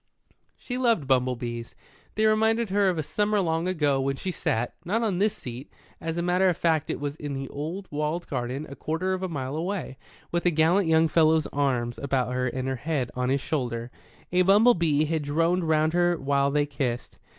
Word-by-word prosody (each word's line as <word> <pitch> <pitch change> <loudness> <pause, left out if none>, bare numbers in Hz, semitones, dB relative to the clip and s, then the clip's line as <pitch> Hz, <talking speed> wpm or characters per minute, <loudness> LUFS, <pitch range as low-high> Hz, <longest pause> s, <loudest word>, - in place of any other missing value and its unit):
She 250 0 -5
loved 230 - +2
bumble 130 -1 +2
bees. 120 -1 -6 0.4
They 215 - +2
reminded 220 0 +2
her 200 -1 +3
of 180 - -1
a 155 - -1
summer 210 +6 0
long 165 -1 0
ago 145 -7 +1
when 135 +1 0
she 185 +7 -4
sat, 120 -7 -1
not 210 +7 0
on 200 -5 0
this 210 +1 +1
seat 125 +2 -8 0.3
as 165 0 -4
a 170 - 0
matter 180 +2 +3
of 175 - -1
fact 160 -3 +1
it - - -2
was 145 0 -3
in 145 -2 -5
the 135 0 -4
old 165 +7 -5
walled 150 +3 -2
garden 130 +2 -3
a 140 - -9
quarter 175 +6 -2
of 185 - -3
a 185 - -2
mile 135 -3 -4
away 170 -4 -3 0.3
with 170 0 0
a - - +7
gallant 165 +4 +3
young 160 0 +4
fellow's 160 0 +3
arms 125 -4 0
about 130 -3 -1
her 125 0 0
and 130 +1 -3
her 130 -1 -1
head 140 -2 -2
on 125 0 -1
his 135 +1 +1
shoulder. 125 -5 -3 0.4
A 180 +1 +3
bumble 205 +6 +6
bee 155 -5 +2
had 160 0 -1
droned 165 +5 +1
round 155 0 +2
her 175 0 +2
while 140 -1 +1
they 145 +1 +1
kissed. 135 -4 -4
155 Hz, 210 wpm, -26 LUFS, 135-180 Hz, 0.4 s, a